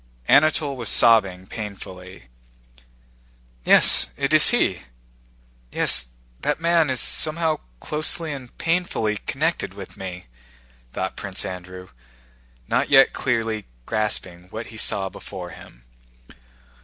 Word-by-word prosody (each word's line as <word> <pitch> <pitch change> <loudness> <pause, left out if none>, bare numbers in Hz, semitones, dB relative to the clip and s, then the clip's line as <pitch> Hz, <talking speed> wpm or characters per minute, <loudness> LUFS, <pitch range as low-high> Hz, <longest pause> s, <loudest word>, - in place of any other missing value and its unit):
Anatole 150 -1 +3
was 120 -4 -1
sobbing 100 -6 +4
painfully. 95 -3 -10 1.4
"Yes, - - +6
it 140 +2 -1
is 155 - +9
he! 95 - +1 0.9
Yes, 60 - +3 0.3
that 150 - -2
man 165 -2 +2
is 130 -2 0
somehow 160 0 +2 0.2
closely 155 - 0
and 130 -3 -11
painfully 165 -11 -1
connected 155 - -2
with 100 -2 -11
me," 90 -2 -8 0.7
thought - - -4
Prince - - -5
Andrew, 90 +1 -9 0.8
not - - 0
yet 135 -1 +5
clearly 115 -4 -2 0.2
grasping 95 - -2
what 110 +4 -7
he - - -10
saw 100 -2 0
before - - -10
him. - - -15
115 Hz, 110 wpm, -22 LUFS, 95-150 Hz, 1.4 s, is